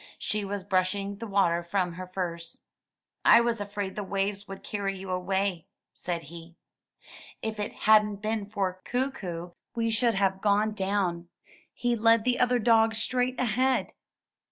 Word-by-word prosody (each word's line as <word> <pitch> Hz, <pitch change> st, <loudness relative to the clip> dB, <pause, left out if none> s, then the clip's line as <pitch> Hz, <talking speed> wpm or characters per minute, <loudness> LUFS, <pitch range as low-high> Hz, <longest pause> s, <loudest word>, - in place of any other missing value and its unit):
She 210 Hz, -1 st, -2 dB
was 200 Hz, -1 st, -4 dB
brushing 195 Hz, +1 st, 0 dB
the 230 Hz, +2 st, -6 dB
water 190 Hz, -4 st, +2 dB
from 180 Hz, 0 st, -1 dB
her 185 Hz, +1 st, -7 dB
furs. 170 Hz, -3 st, -4 dB, 0.7 s
'1 235 Hz, -, +7 dB
was 230 Hz, -3 st, 0 dB
afraid 200 Hz, -1 st, -4 dB
the 210 Hz, -, -3 dB
waves 200 Hz, +1 st, -2 dB
would 195 Hz, 0 st, -9 dB
carry 195 Hz, -2 st, -3 dB
you 190 Hz, 0 st, -6 dB
away," 185 Hz, -1 st, -1 dB, 0.3 s
said 170 Hz, -2 st, -4 dB
he. 165 Hz, +2 st, -11 dB, 0.9 s
''If 220 Hz, -1 st, -3 dB
it 205 Hz, -, -3 dB
hadn't 210 Hz, -1 st, +6 dB
been 215 Hz, 0 st, -3 dB
for 190 Hz, -3 st, -2 dB
Kookoo 195 Hz, -10 st, -3 dB, 0.2 s
we 230 Hz, -1 st, 0 dB
should 230 Hz, 0 st, +2 dB
have 195 Hz, -1 st, +1 dB
gone 210 Hz, +1 st, +3 dB
down; 190 Hz, -4 st, -1 dB, 0.4 s
he 240 Hz, -1 st, 0 dB
led 225 Hz, 0 st, +4 dB
the 250 Hz, +1 st, +1 dB
other 250 Hz, 0 st, +3 dB
dogs 225 Hz, -1 st, +4 dB
straight 250 Hz, +2 st, 0 dB
ahead.'' 255 Hz, +2 st, +1 dB
200 Hz, 155 wpm, -28 LUFS, 185-225 Hz, 0.9 s, 1